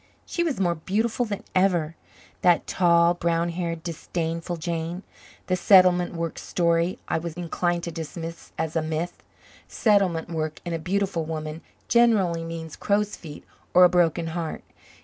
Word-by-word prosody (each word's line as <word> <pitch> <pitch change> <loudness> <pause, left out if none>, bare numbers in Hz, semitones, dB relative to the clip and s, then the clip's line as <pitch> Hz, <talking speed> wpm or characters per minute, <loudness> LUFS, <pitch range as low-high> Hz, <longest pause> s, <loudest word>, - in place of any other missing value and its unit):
She 345 - -2
was 320 -9 0
more 175 -3 +2
beautiful 220 +8 -1
than 205 -2 -4
ever, 175 -4 +2 0.5
that 175 -2 +4
tall, 170 -1 +4
brown 170 -1 0
haired, 170 -1 -3
disdainful 170 0 -3
Jane. 170 +2 -3 0.4
The 185 - +1
settlement 180 -2 +5
work 165 -1 -3
story 170 0 +1
I - - 0
was 165 -1 -6
inclined 175 0 -1
to 170 - -4
dismiss 165 +1 -7
as 160 0 -2
a 165 - +2
myth. 160 +2 -3 0.5
Settlement 195 -7 +2
work 155 -2 -3
in 175 - -3
a 165 - -1
beautiful 190 -1 -1
woman 155 0 -5 0.3
generally 205 -8 +3
means 165 -1 -6
crowsfeet 200 -7 -2 0.3
or 180 - +9
a 180 - +8
broken 170 -1 +2
heart. 165 -2 -4
170 Hz, 150 wpm, -25 LUFS, 165-185 Hz, 0.5 s, or